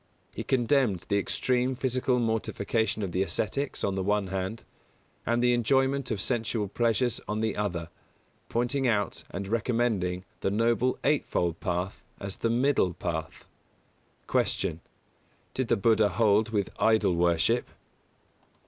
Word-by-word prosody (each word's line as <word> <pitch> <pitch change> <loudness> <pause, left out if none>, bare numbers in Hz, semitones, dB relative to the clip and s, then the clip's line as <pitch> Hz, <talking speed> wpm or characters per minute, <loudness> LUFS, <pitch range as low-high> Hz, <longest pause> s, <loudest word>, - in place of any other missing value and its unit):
He - - -4
condemned 120 - +2
the 100 - +3
extreme 125 +4 0
physical 130 0 +1
mortification 110 -1 0
of 95 - -3
the 90 - 0
ascetics, 110 +8 -1
on 100 - +1
the 95 - -1
one 100 0 0
hand, 95 +4 -3 0.6
and 120 +1 +2
the 125 0 +4
enjoyment 135 +3 +2
of 110 -4 -1
sensual 110 -1 -1
pleasures 120 +3 +1
on 105 +1 -2
the 110 -2 0
other; 85 -5 -2 0.6
pointing 125 +3 0
out 105 -4 0
and 95 +2 -5
recommending 110 -5 0
the - - 0
Noble 115 +4 +1
Eightfold 90 - +1
Path 90 +1 -2 0.2
as 100 -1 -6
the 115 - 0
Middle 120 -7 +2
Path. 80 -2 -4 0.8
179. 80 - 0 0.7
Q. 130 - 0
_Did - - -7
the 120 - +2
Buddha 110 0 +4
hold 110 +1 +3
with 105 -3 -1
idol 110 -4 +3
worship? 85 +7 +2
110 Hz, 140 wpm, -28 LUFS, 95-120 Hz, 0.8 s, the